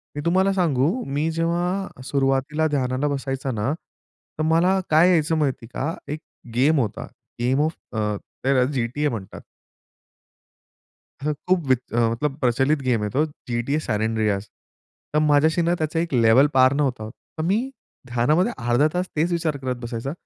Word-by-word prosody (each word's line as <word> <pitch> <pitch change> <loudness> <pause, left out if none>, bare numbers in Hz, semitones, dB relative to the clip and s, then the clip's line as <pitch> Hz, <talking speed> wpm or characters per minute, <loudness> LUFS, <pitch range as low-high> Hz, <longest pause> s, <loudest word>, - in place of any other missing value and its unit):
मी 145 - -3
तुम्हाला 190 +3 +3
सांगू 155 -6 +2
मी 145 +4 -1
जेव्हा 175 0 -2
सुरुवातीला 140 +3 +1
ध्यानाला 135 -1 0
बसायचा 135 -1 -2
ना 115 +4 -1
तर 155 -1 -11
मला 180 +4 +3
काय 160 +4 +6
यायचं 160 -2 +2
माहिती 135 -6 -1
आहे - - -12 0.2
का 165 - -5 0.2
एक 155 - -5 0.4
गेम 145 +4 +4
होता, 110 -6 -2 0.3
गेम 130 +4 +2
ऑफ 155 +2 0 0.2
अ, 105 -1 0 0.3
त्याला 130 -1 +3
GTA 135 +3 -1
म्हणतात. 105 -5 -7 1.8
हं, 150 - +1 0.2
खूप 180 -3 +2
वीत 130 -2 +3
मतलब 120 +5 +1
प्रचलित 135 +4 +2
गेम 120 -5 +1
आहे 105 - -2
तो 150 - +4 0.3
GTA 120 +5 0
San 105 -3 0
Andreas 105 -2 0 0.7
तर 150 - +4
माझ्याशी 155 +2 +3
ना 170 +1 +2
त्याचा 160 +1 -1
1 170 -3 -3
लेव्हल 120 +3 +6
पार 130 0 +6
नव्हता 135 -6 0
होत. 110 - -8 0.3
तर 155 - -1
मी 190 +6 +2 0.5
ध्यानामध्ये 125 +9 +2
अर्धा 120 +5 +4
तास 180 +1 0
तेच 165 +4 +1
विचार 165 -3 0
करत 130 -2 -3
बसायचा 120 +3 -4
140 Hz, 160 wpm, -23 LUFS, 125-160 Hz, 1.8 s, काय